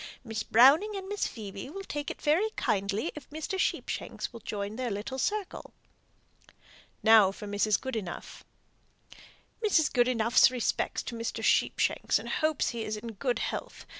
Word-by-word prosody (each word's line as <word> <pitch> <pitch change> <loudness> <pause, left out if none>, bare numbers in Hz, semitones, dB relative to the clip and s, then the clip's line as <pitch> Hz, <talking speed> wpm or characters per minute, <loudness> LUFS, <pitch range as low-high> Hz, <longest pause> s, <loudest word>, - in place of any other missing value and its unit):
Miss 220 -3 -4
Browning 280 - +5
and 385 -1 -5
Miss 410 +1 -1
Phoebe 205 +1 -8
will 390 +6 -7
take 295 -5 -4
it - - -6
very 335 +9 +2
kindly 200 - -1
if 300 - -11
Mr. 315 +6 -4
Sheepshanks - - -2
will 230 - -8
join 205 -1 -4
their 250 0 -2
little 215 +6 -4
circle." 415 +6 -3 1.3
Now 220 -4 +7
for 200 - -9
Mrs. 205 +1 +1
Goodenough. 220 -9 -6 1.2
"Mrs. 330 -8 +3
Goodenough's 240 -2 +4
respects 250 -1 -1
to 240 - -6
Mr. 230 0 -4
Sheepshanks, - - +2
and - - -7
hopes 310 -2 +1
he 235 -2 -4
is 215 0 -3
in 230 +2 -7
good 245 +4 -1
health. - - -5
240 Hz, 150 wpm, -29 LUFS, 215-305 Hz, 1.3 s, Now